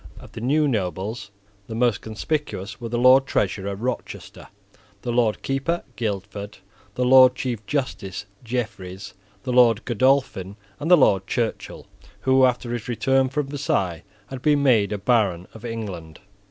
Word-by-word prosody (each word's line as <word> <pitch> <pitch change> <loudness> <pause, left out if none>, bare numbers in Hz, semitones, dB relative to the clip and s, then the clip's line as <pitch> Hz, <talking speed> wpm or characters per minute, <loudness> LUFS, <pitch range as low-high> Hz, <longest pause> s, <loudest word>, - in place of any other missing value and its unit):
Of - - -14
the - - -8
new 145 +5 +2
nobles, 100 -2 -3 0.4
the 110 - -6
most 120 -2 +1
conspicuous 110 -4 -4
were 115 - -5
the 120 - -2
Lord 130 +2 +6
Treasurer 100 -2 -1
Rochester, 125 +6 -6 0.6
the 120 - -2
Lord 115 -3 +1
Keeper 135 +6 -1
Guildford, 100 -1 -4 0.4
the 125 - 0
Lord 130 0 +7
Chief 120 -5 -3
Justice 110 -9 -3 0.2
Jeffreys, 105 -7 -5 0.3
the 130 -1 -2
Lord 120 -3 +4
Godolphin, 120 -6 +1 0.2
and 150 +4 -3
the 180 - +8
Lord 95 - +3
Churchill, 115 -2 -3 0.4
who, 130 0 +4
after 125 -1 -1
his 120 -3 -5
return 130 +2 +1
from 145 +2 -1
Versailles, 95 - -1 0.2
had 130 +4 -8
been 145 -1 +3
made 110 -7 +3
a 105 - -1
Baron 100 -5 +1
of 110 - -13
England. 100 -9 -6
120 Hz, 150 wpm, -23 LUFS, 100-130 Hz, 0.6 s, the